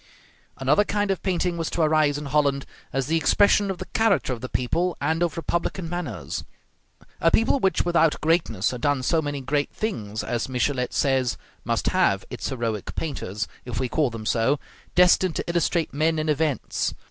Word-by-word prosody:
Another 140 +9 +3
kind 205 -1 0
of 190 - -2
painting 180 -2 0
was 165 - -1
to 170 - 0
arise 155 -2 +3
in 150 - -6
Holland, 140 -1 +1 0.3
as 135 -1 -1
the 160 +4 +1
expression 205 +4 +4
of 190 - -2
the 185 - -6
character 220 -12 +1
of 115 - -7
the 130 - -5
people 170 +8 0
and 160 +4 0
of 170 -2 0
republican 170 +1 -2
manners. 160 - -4 0.8
A 165 - +4
people 225 +9 +3
which 190 -5 +1
without 165 -3 +3
greatness 155 - +1
had 125 -2 -6
done 145 -2 +1
so 160 +5 +2
many 145 -2 -3
great 145 +2 0
things, 110 - -4
as 120 +1 -2
Michelet 125 0 0
says, 130 -3 +1 0.3
must - - 0
have - - +2
its - - -4
heroic 115 -5 -3
painters, 115 - -3 0.2
if 120 -2 -4
we 130 - 0
call 145 +2 +1
them 115 -2 -7
so, 120 +6 +2 0.4
destined 180 -1 +4
to - - -2
illustrate 170 -1 0
men 160 +3 +1
and 155 0 +1
events. 150 -4 -1
150 Hz, 180 wpm, -24 LUFS, 130-170 Hz, 0.8 s, expression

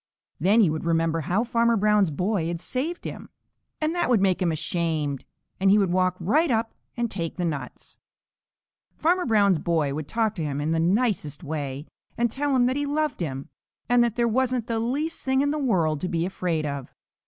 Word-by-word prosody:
Then 200 +9 +4
he 190 - +4
would 155 - -3
remember 165 -1 +1
how 185 +9 0
Farmer 235 -1 +2
Brown's 210 -2 +3
boy 180 +3 -1
had 170 0 -3
saved 285 - -3
him, - - -7 0.5
and 310 +1 0
that 345 -7 0
would 240 -4 +4
make 190 -2 +2
him 175 -2 +2
ashamed, 155 -3 -2 0.3
and 195 +1 +3
he 200 - +6
would 195 -4 +2
walk 185 0 +2
right 290 - +2
up 225 -2 0 0.2
and 235 -1 -1
take 170 -4 -4
the 180 - -1
nuts. 150 -5 -6 1.0
Farmer 350 +1 +1
Brown's 200 -6 +4
boy 155 -4 0
would 150 0 -4
talk 225 +1 0
to 170 -6 -4
him 145 -2 -2
in 150 +2 -1
the 165 - +1
nicest 180 - 0
way 145 -2 -4 0.3
and 235 -1 +1
tell 280 +1 0
him 245 -1 +4
that 255 +2 +1
he 290 0 -1
loved 300 0 -1
him, 135 -5 -4 0.4
and 245 0 +4
that 235 -2 0
there 240 -1 +2
wasn't 250 0 0
the 230 -1 -1
least 280 +8 -2
thing 265 0 +2
in 285 0 +1
the 305 - -1
world 170 - +1
to 180 - -2
be 170 -1 0
afraid 175 -4 -2
of. 140 -3 -5
195 Hz, 205 wpm, -25 LUFS, 165-245 Hz, 1.0 s, he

